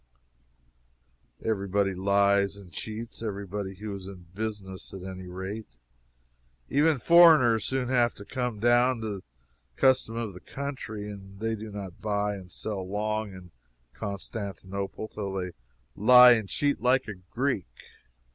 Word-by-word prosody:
Every 100 -3 0
body 100 0 +1
lies 100 +1 +2
and 95 -3 -13
cheats 110 +3 -6
every 100 -3 -4
body 95 0 -5
who 105 +1 -6
is 95 -1 -8
in 95 -3 -10
business, 100 -3 -5
at 95 - -8
any 95 -1 -7
rate. 95 - -7 0.9
Even 150 +1 +4
foreigners 155 -6 +6
soon 130 -2 -1
have 120 -2 +3
to 100 - -11
come 125 -3 -3
down 120 +1 +3
to 110 - -3
the 95 - -12 0.5
custom 130 - +3
of 115 -4 -3
the 90 - -10
country, 125 -7 -6
and 95 -1 -10
they 110 +1 -1
do 110 0 -7
not 100 -3 -8
buy 105 -1 0
and 95 -2 -9
sell 105 -3 -4
long 105 +2 -2
in 95 -2 -12 0.4
Constantinople 100 -1 -5
till 100 -3 -5
they 90 -1 -3 0.4
lie 125 +3 +9
and 110 -5 +2
cheat 145 -1 0
like 130 +1 +3
a 105 - -4
Greek. 95 - -2
105 Hz, 145 wpm, -28 LUFS, 95-120 Hz, 0.9 s, lie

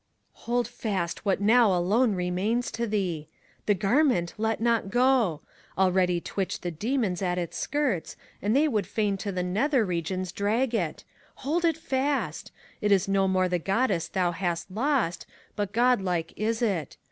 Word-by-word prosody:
Hold 245 0 +1
fast 205 -7 -3
what 195 -2 +2
now 225 +1 +5
alone 210 +5 +2
remains 185 +7 -1
to 235 0 -2
thee 180 -8 -2 0.3
f - - -39
The 205 - +4
garment 200 - +2
let 220 0 0
not 230 -3 +1
go! 245 - +2 0.4
Already 185 -2 +3
twitch 190 +2 -3
The 175 - -3
Demons 210 - -1
at 180 -1 0
its 175 -2 -3
skirts, 270 - -1 0.3
and 210 +4 +1
they 300 +3 +4
would 215 -8 0
fain 210 -3 0
To 200 +1 -4
the 180 -1 -2
Nether 225 +7 +1
Regions 180 +1 -2
drag 225 +6 0
it! 175 -9 -2 0.4
Hold 335 +5 +1
it 325 -2 +2
fast! 280 -2 -2 0.3
It 210 -1 +1
is 195 -2 +4
no 195 0 +2
more 185 -1 +2
the 180 -1 0
Goddess 195 -1 0
thou 180 -2 0
hast 175 0 -3
lost, 225 - 0 0.3
But 205 -2 -2
godlike 200 -8 +1
is 225 +2 -1
it. 185 -10 -1
200 Hz, 165 wpm, -27 LUFS, 180-240 Hz, 0.4 s, now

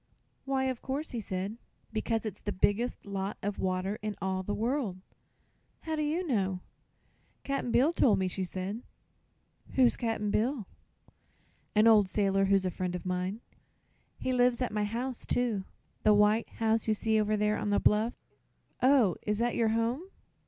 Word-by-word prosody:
"Why 270 -1 0
of 260 -2 -2
course?" 280 +4 -3
he 240 - -3
asked. 195 +1 -4 0.4
"Because 225 +1 -1
it's 210 -2 -5
the 205 - -3
biggest 205 +5 0
lot 195 0 -3
of 205 0 -2
water 185 +2 -1
in 210 -1 -3
all 190 0 -1
the 205 +2 -3
world." 235 -4 -1 0.8
"How 320 -1 -3
do 305 - -1
you 315 +5 0
know?" 195 - 0 0.8
"Cap'n 275 -3 -2
Bill 280 +9 +4
told 245 -10 +4
me," 190 - 0
she 190 +1 -3
said. 190 +5 -4 0.9
"Who's 255 -2 +4
Cap'n 225 -3 -1
Bill?" 235 +1 0 1.1
"An 215 +1 +5
old 215 -4 +6
sailorman 195 -1 +2
who's 195 -1 +3
a 185 - 0
friend 180 0 -3
of 180 - -6
mine. 185 +4 -2 0.8
He 255 - -1
lives 245 -1 +3
at 250 - -1
my 210 -1 +1
house, 240 +4 -3
too 225 -6 0 0.4
the 210 -1 +5
white 210 +2 +3
house 225 0 0
you 215 - +3
see 220 0 +2
over 215 0 +1
there 210 0 +1
on 210 - -2
the 205 - +3
bluff." 215 +3 +2 0.7
"Oh; 255 -8 +4
is 210 0 -1
that 235 +1 +1
your 230 -2 +2
home?" 230 +8 0
215 Hz, 170 wpm, -30 LUFS, 195-245 Hz, 1.1 s, old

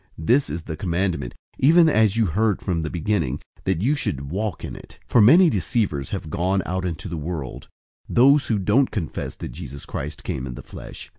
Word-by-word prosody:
This 120 - +2
is 80 +2 -4
the 80 - -5
commandment, 85 -5 -2 0.2
even 165 +5 +6
as 110 -7 +3
you 115 - +3
heard 105 +4 +1
from 85 -4 -1
the 80 - -3
beginning, 80 -6 -1 0.3
that 95 -1 0
you 135 +6 +3
should 70 - -3
walk 100 -2 -3
in - - -7
it. - - -12
001:007 - - -29
For 120 - +6
many 165 - +7
deceivers 90 - 0
have 80 - -5
gone 95 +3 0
out 95 +1 -2
into 85 +2 -4
the 85 -1 -4
world, 75 -4 -5 0.4
those 135 +3 +5
who 110 - +1
don't 105 +8 +2
confess 85 -8 -4
that - - -7
Jesus 70 -4 -9
Christ 75 -2 -6
came 65 0 -4
in 60 - -6
the - - -9
flesh. - - -10
90 Hz, 205 wpm, -23 LUFS, 80-110 Hz, 0.4 s, many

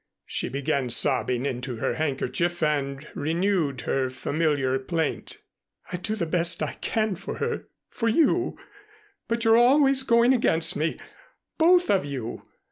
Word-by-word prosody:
She - - -3
began 135 -1 -1
sobbing 125 0 +2
into 125 -2 -3
her 115 - -1
handkerchief 160 +3 -2
and 140 -2 -1
renewed 160 -3 -1
her 130 -1 -1
familiar 140 -1 0
plaint. 160 +3 -3 0.6
"I - - -1
do 215 +5 -3
the 200 - -2
best 170 +1 +1
I - - -3
can 215 -2 0
for 190 +2 -6
her - - -3 0.2
for 230 -1 -2
you, 330 +7 +2 0.7
but 230 0 -1
you're 225 0 +6
always 270 +2 +5
going 240 -1 +4
against 165 -9 +2
me 160 +2 -1 0.6
both 355 +2 +4
of 195 -5 +2
you. 130 -5 -6
165 Hz, 140 wpm, -25 LUFS, 140-225 Hz, 0.7 s, you're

